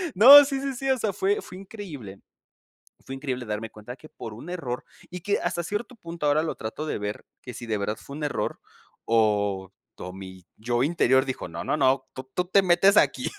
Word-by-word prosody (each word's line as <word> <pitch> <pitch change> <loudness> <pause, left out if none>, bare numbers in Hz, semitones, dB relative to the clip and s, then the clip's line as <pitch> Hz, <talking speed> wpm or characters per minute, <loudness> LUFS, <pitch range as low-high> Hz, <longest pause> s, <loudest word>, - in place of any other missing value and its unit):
No, 275 +9 +11
sí, 275 -1 -3
sí, 275 -1 -2
sí. 270 +2 -3
O 260 - +2
sea, 215 -2 0
fue 405 +3 0
fue 185 - -11
increíble 165 - -9 0.9
fue 135 - -7
increíble 130 -3 -4
darme 105 +1 -4
cuenta 105 +3 -10
de - - -10
que 155 - -14
por 110 -2 -8
un 135 +11 -10
error, 130 -9 -4 0.3
y 180 - -7
que 200 +4 0
hasta 170 - -2
cierto 210 +7 -4
punto 170 -6 -5
ahora 145 +1 +3
lo 160 - -3
trato 125 +8 -5
de - - -2
ver 105 0 -5 0.2
que 125 - -9
si 120 - -8
de 110 -2 -1
verdad 105 +2 -2
fue 140 - -10
un 150 - -4
error, 145 - -3 0.5
o 105 -4 +1 0.2
todo 90 - -7
mi 95 -1 -11
yo 120 +2 -1
interior 130 -4 +3
dijo: 130 -8 -4
"No, 85 0 -6
no, - - 0
no, 135 -2 +2
tú 130 0 -9
tú 180 - 0
te 195 +2 +4
metes 185 +3 +4
aquí." - - +2
140 Hz, 220 wpm, -25 LUFS, 110-185 Hz, 0.9 s, No